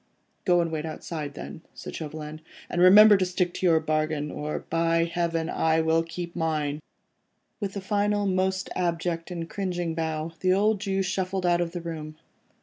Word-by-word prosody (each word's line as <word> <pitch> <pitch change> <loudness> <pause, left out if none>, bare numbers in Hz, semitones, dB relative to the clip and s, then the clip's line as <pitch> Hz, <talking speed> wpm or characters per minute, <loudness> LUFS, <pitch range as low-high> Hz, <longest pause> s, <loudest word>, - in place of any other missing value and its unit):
"Go 175 -2 +4
and 165 -1 -2
wait 155 -1 -2
outside 155 -2 -5
then," - - -8
said - - -8
Chauvelin, 155 0 -6 0.3
"and 175 - 0
remember 205 +3 +9
to 190 - +1
stick 180 -1 0
to 185 - 0
your 165 -2 +5
bargain, 155 -1 -1
or 150 +1 -4
by 165 0 +2
Heaven, 170 -1 -1
I 160 -1 +2
will 160 0 +3
keep 170 +1 -6
to - - -6
mine." 155 -2 -1 0.8
With 200 -1 -4
a - - -3
final, 205 +1 +1
most 190 0 0
abject 170 -1 -1
and 170 -2 -4
cringing 175 -3 -2
bow, 160 0 -2
the 185 0 +3
old 205 +1 +2
Jew 195 -2 0
shuffled 190 0 -2
out 175 0 +3
of 170 -1 -1
the 175 - -4
room. 155 -2 -6
170 Hz, 180 wpm, -26 LUFS, 160-185 Hz, 0.8 s, remember